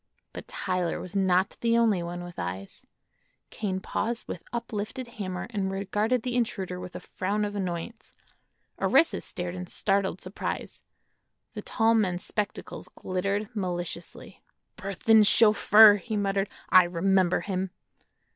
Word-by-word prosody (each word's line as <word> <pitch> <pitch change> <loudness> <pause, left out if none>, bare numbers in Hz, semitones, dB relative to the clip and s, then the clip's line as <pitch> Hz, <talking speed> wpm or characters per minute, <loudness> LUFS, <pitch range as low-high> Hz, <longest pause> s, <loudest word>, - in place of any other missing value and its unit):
But - - -8
Tyler 180 -2 -2
was 185 +1 -7
not 190 -1 +2
the 230 0 +3
only 220 -6 +3
one 175 +1 -5
with 175 0 -9
eyes. 90 +3 -6 0.6
Kane 190 -3 -3
paused 230 +4 -3
with 175 - -6
uplifted 235 +2 -4
hammer 190 -6 -5
and 195 -3 -1
regarded 210 +5 0
the 250 -1 -2
intruder 195 -7 -2
with 180 0 -9
a - - -4
frown 205 +3 -2
of 205 - -4
annoyance; 190 +3 -5 0.7
Orissa 330 - +3
stared 175 0 -5
in 180 0 -6
startled 195 -1 0
surprise; 185 +2 -5 0.7
the - - -6
tall 225 -1 +2
man's 185 -5 +1
spectacles 210 -1 -4
glittered 195 +3 -2
maliciously. 175 -3 -5 0.3
"Burthon's 205 +3 +3
chauffeur!" 215 -1 +7
he 215 +1 -4
muttered; 195 0 0 0.2
"I 185 -1 +8
remember 185 +1 +2
him." 190 -1 -2
195 Hz, 135 wpm, -27 LUFS, 180-215 Hz, 0.7 s, I